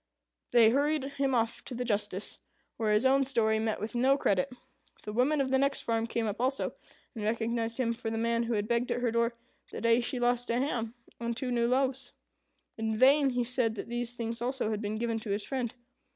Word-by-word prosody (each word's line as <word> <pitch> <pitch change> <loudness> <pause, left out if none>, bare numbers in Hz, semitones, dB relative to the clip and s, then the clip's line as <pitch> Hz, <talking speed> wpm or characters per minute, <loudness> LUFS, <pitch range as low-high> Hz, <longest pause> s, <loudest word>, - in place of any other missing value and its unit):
They 230 -2 +6
hurried 290 +2 +1 0.2
him 270 -2 +2
off 230 -1 0
to 250 - -4
the 250 +1 -3
justice, 205 -3 -2 0.4
where 220 -2 +1
his 210 +4 +3
own 270 +1 +5
story 220 -5 +2
met 220 -1 -1
with 215 +2 -4
no 260 +3 +3
credit. 200 -2 +1 0.5
The 210 - -6
woman 265 +6 +2
of 265 -1 0
the 265 - +4
next 275 0 +1
farm 230 0 0
came 230 0 -1
up 215 +2 -3
also, 265 +2 0 0.4
and 220 - -6
recognized 230 +1 -1
him 235 -3 +1
for 230 -1 -4
the 225 - -3
man 230 +1 +1
who 235 0 -1
had 210 -1 -1
begged 235 +1 0
at 245 - -1
her 240 -2 +1
door 235 +1 +1 0.4
the - - -5
day 230 0 +4
she 245 +1 -1
lost 245 0 +1
a 235 - +1
ham 240 -4 -1 0.2
and 235 0 -3
two 255 -1 -2
new 235 -1 +2
loaves. 260 0 0 0.7
In 220 0 -1
vain 275 +3 +5
he 245 -1 0
said 235 -2 0
that 220 - -6
these 240 0 -3
things 230 -1 -4
also 250 -2 -1
had 215 -1 -2
been 210 0 -3
given 230 0 -1
to 220 - -8
his 200 +1 -1
friend. 255 -4 -2
235 Hz, 225 wpm, -30 LUFS, 225-255 Hz, 0.7 s, They